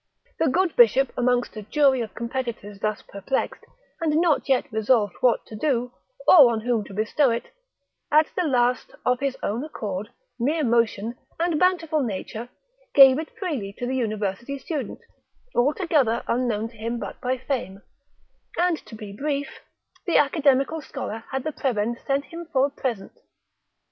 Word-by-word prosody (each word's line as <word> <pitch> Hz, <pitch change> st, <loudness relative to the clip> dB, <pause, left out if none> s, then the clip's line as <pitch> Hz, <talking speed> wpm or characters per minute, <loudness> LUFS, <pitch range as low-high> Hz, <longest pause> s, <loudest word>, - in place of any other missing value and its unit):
The 325 Hz, -, +3 dB
good 355 Hz, +5 st, +1 dB
bishop 245 Hz, +3 st, +5 dB
amongst 245 Hz, -1 st, +1 dB
a 215 Hz, -, -5 dB
jury 265 Hz, +4 st, +3 dB
of 215 Hz, -4 st, -6 dB
competitors 235 Hz, -4 st, -4 dB
thus 215 Hz, 0 st, -2 dB
perplexed, 200 Hz, +7 st, -3 dB, 0.4 s
and 310 Hz, -1 st, +2 dB
not 325 Hz, -5 st, +2 dB
yet 265 Hz, -2 st, +3 dB
resolved 215 Hz, -2 st, +2 dB
what 245 Hz, -2 st, +3 dB
to 220 Hz, -, -10 dB
do, 245 Hz, 0 st, 0 dB, 0.4 s
or 285 Hz, -9 st, +9 dB
on 225 Hz, -1 st, -2 dB
whom 235 Hz, -2 st, 0 dB
to -, -, -11 dB
bestow 225 Hz, +6 st, +2 dB
it, 235 Hz, 0 st, -3 dB, 0.6 s
at 305 Hz, +1 st, +6 dB
the 365 Hz, -, +1 dB
last, 250 Hz, -2 st, +1 dB
of 250 Hz, 0 st, +2 dB
his 275 Hz, -2 st, -2 dB
own 225 Hz, +6 st, -1 dB
accord, 210 Hz, -9 st, -5 dB, 0.3 s
mere 300 Hz, +6 st, +1 dB
motion, 230 Hz, -1 st, +1 dB, 0.2 s
and 335 Hz, -2 st, +1 dB
bountiful 335 Hz, -4 st, +2 dB
nature, 225 Hz, +1 st, -4 dB, 0.5 s
gave 270 Hz, 0 st, +9 dB
it 315 Hz, -, -5 dB
freely 275 Hz, -, -4 dB
to 245 Hz, -, -3 dB
the 255 Hz, -, -2 dB
university 215 Hz, +2 st, -2 dB
student, 290 Hz, 0 st, -5 dB, 0.5 s
altogether 280 Hz, -, +2 dB
unknown 230 Hz, -3 st, 0 dB
to 230 Hz, -, -19 dB
him 230 Hz, +2 st, -3 dB
but -, -, -7 dB
by 255 Hz, +1 st, 0 dB
fame; 235 Hz, -7 st, -4 dB, 0.7 s
and 350 Hz, -2 st, +1 dB
to 225 Hz, -, -10 dB
be 210 Hz, -2 st, -8 dB
brief, 285 Hz, +5 st, -3 dB, 0.5 s
the 345 Hz, -, +3 dB
academical 285 Hz, +1 st, +2 dB
scholar 225 Hz, -7 st, -6 dB
had 265 Hz, -1 st, -2 dB
the 310 Hz, -, -2 dB
prebend 235 Hz, -4 st, -1 dB
sent 275 Hz, +1 st, +1 dB
him 335 Hz, 0 st, -9 dB
for 265 Hz, 0 st, +3 dB
a 285 Hz, -, -3 dB
present. 250 Hz, -, -4 dB
250 Hz, 160 wpm, -24 LUFS, 225-290 Hz, 0.7 s, or